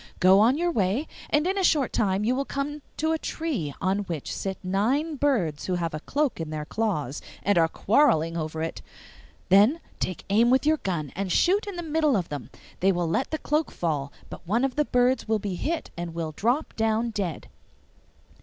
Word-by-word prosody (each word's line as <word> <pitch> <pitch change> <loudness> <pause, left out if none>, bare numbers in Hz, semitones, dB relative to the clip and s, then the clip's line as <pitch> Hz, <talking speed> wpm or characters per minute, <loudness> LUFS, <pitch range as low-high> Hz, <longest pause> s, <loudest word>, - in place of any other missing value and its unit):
Go 190 +2 +6
on 240 +6 +4
your 345 +1 +1
way, 215 - 0 0.2
and 295 +2 +2
in 385 +2 0
a - - 0
short 295 -7 +2
time 195 -1 +1
you 235 +4 +2
will 270 +2 0
come 285 +2 -4 0.2
to 315 +1 +1
a 320 - 0
tree 275 - -3
on 190 +1 +1
which 170 -8 -4
sit 190 -1 -3
nine 245 - 0
birds 225 - 0
who 185 - 0
have 170 -2 -2
a 155 - -3
cloak 280 - -1
in 160 - -4
their 155 -1 -4
claws 155 - -2 0.2
and 205 - +3
are 165 -1 +4
quarrelling 170 - +2
over 160 -1 -3
it. 165 - -4 0.7
Then 210 - +5 0.2
take 185 - -3
aim 230 +4 +5
with 260 +2 +3
your 310 +1 +4
gun 170 - -3
and 195 -1 -2
shoot 395 - +3
in 400 - -5
the 345 - -4
middle 305 -5 +2
of 175 -3 -3
them; 145 -5 -6 0.3
they 195 +2 +4
will 175 -2 0
let 165 +11 0
the 315 - -2
cloak 305 +1 0
fall, 145 -5 -2 0.2
but - - -11
one 230 +7 +2
of 265 - -3
the 300 - +2
birds 250 0 +2
will 220 0 +2
be 200 -2 -4
hit 320 - -3
and 170 -1 -5
will 165 -2 -3
drop 240 - -1
down 225 +1 +1
dead. 190 -7 -3
215 Hz, 210 wpm, -26 LUFS, 175-290 Hz, 0.7 s, Go